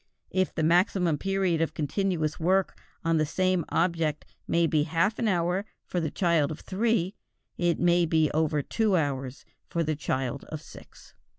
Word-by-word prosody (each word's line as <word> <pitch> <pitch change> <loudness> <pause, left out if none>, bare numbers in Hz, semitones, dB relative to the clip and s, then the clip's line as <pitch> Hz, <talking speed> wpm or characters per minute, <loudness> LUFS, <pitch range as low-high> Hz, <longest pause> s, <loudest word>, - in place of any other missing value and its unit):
If 185 -1 0
the 160 - 0
maximum 175 -1 +3
period 195 -4 0
of 165 - -1
continuous 160 0 -1
work 185 +3 +2 0.3
on 165 0 +3
the 155 - +2
same 185 +2 +1
object 165 -3 0 0.2
may 170 0 +3
be 155 -2 +2
half 170 +8 0
an 230 - +1
hour 180 0 +1 0.2
for 180 - -2
the 160 -2 -1
child 170 -6 +2
of 155 - -7
three, 200 -2 0 0.4
it 175 -1 +1
may 175 0 +3
be 160 -1 +2
over 155 -2 +1
two 215 - +1
hours 135 -4 -3 0.2
for 170 - -1
the 155 -1 -1
child 135 -2 -2
of 155 - -6
six. - - -15
170 Hz, 170 wpm, -27 LUFS, 155-185 Hz, 0.4 s, maximum